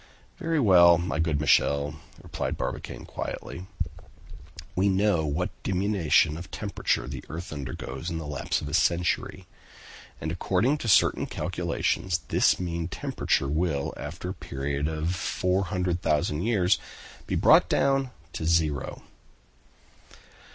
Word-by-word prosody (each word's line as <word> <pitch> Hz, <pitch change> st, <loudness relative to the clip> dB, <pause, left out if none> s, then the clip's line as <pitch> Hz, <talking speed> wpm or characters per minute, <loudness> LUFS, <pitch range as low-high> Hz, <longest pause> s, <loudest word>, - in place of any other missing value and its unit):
"Very 165 Hz, -3 st, 0 dB
well, 90 Hz, -7 st, +7 dB
my 85 Hz, -1 st, -2 dB
good 80 Hz, -3 st, +1 dB
Michel," 75 Hz, 0 st, +2 dB, 0.2 s
replied -, -, -3 dB
Barbicane -, -, -5 dB
quietly; 90 Hz, +2 st, -6 dB, 1.1 s
"we 95 Hz, +2 st, +3 dB
know 95 Hz, -4 st, +2 dB
what 85 Hz, +5 st, -1 dB
diminution 90 Hz, -5 st, +2 dB
of 85 Hz, -, -8 dB
temperature -, -, -1 dB
the -, -, -6 dB
earth 85 Hz, +1 st, -6 dB
undergoes 65 Hz, +1 st, -5 dB
in 85 Hz, -, -3 dB
the 80 Hz, -, -5 dB
lapse 75 Hz, -2 st, -2 dB
of 75 Hz, -, -5 dB
a 70 Hz, -, -6 dB
century. 85 Hz, +3 st, +1 dB, 0.7 s
And 80 Hz, -, -3 dB
according 100 Hz, -, +1 dB
to 120 Hz, -, -4 dB
certain 100 Hz, -, +4 dB
calculations, 90 Hz, -3 st, -1 dB
this -, -, +3 dB
mean 85 Hz, -2 st, -2 dB
temperature 70 Hz, -4 st, -1 dB
will 75 Hz, -1 st, -1 dB
after -, -, -6 dB
a -, -, -3 dB
period 70 Hz, +2 st, -3 dB
of 80 Hz, +2 st, -1 dB
400,000 90 Hz, -5 st, 0 dB
years, 100 Hz, -3 st, +2 dB, 0.5 s
be -, -, -1 dB
brought -, -, +5 dB
down 135 Hz, -1 st, +2 dB, 0.2 s
to 80 Hz, -, -4 dB
zero!" 80 Hz, -5 st, 0 dB
85 Hz, 125 wpm, -27 LUFS, 75-95 Hz, 1.1 s, well